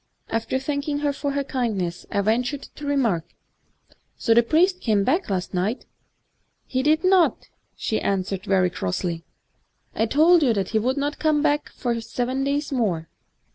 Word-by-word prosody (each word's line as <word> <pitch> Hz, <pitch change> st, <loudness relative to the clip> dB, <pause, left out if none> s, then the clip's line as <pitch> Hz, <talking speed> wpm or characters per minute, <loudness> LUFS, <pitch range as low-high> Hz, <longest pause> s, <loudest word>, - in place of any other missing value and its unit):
After 225 Hz, +3 st, -1 dB
thanking 285 Hz, +2 st, -2 dB
her 285 Hz, -, +1 dB
for 280 Hz, 0 st, -3 dB
her 280 Hz, 0 st, 0 dB
kind 245 Hz, -6 st, -2 dB
ness, 175 Hz, -1 st, -4 dB
I 200 Hz, -, 0 dB
ventured 245 Hz, +7 st, 0 dB
to 295 Hz, -, -8 dB
remark, 235 Hz, -, +1 dB, 0.9 s
*So 225 Hz, -, +2 dB
the 235 Hz, -, +6 dB
priest 355 Hz, +9 st, +2 dB
came 210 Hz, -4 st, +2 dB
back 320 Hz, -, +1 dB
last 185 Hz, -2 st, -2 dB
night? 195 Hz, +7 st, -1 dB, 0.3 s
' -, -, -48 dB
* -, -, -47 dB, 0.2 s
He 260 Hz, -, -1 dB
did 310 Hz, +4 st, +2 dB
not,' 370 Hz, -2 st, +3 dB, 0.3 s
she 220 Hz, -, -2 dB
answered 195 Hz, -1 st, -1 dB
very 185 Hz, -3 st, +2 dB
crossly 165 Hz, -, -3 dB, 0.2 s
— -, -, -46 dB
* -, -, -44 dB
I 225 Hz, -, +1 dB
told 320 Hz, +7 st, +5 dB
you 255 Hz, -6 st, +3 dB
that 195 Hz, -2 st, -1 dB
he 220 Hz, -, +1 dB
would 255 Hz, +5 st, 0 dB
not 290 Hz, +1 st, -2 dB
come 310 Hz, -2 st, +2 dB
back 295 Hz, -1 st, +1 dB
for 235 Hz, -2 st, -3 dB
seven 245 Hz, +3 st, -2 dB
days 285 Hz, +2 st, -1 dB
more. 190 Hz, -11 st, -1 dB
250 Hz, 185 wpm, -23 LUFS, 200-290 Hz, 0.9 s, the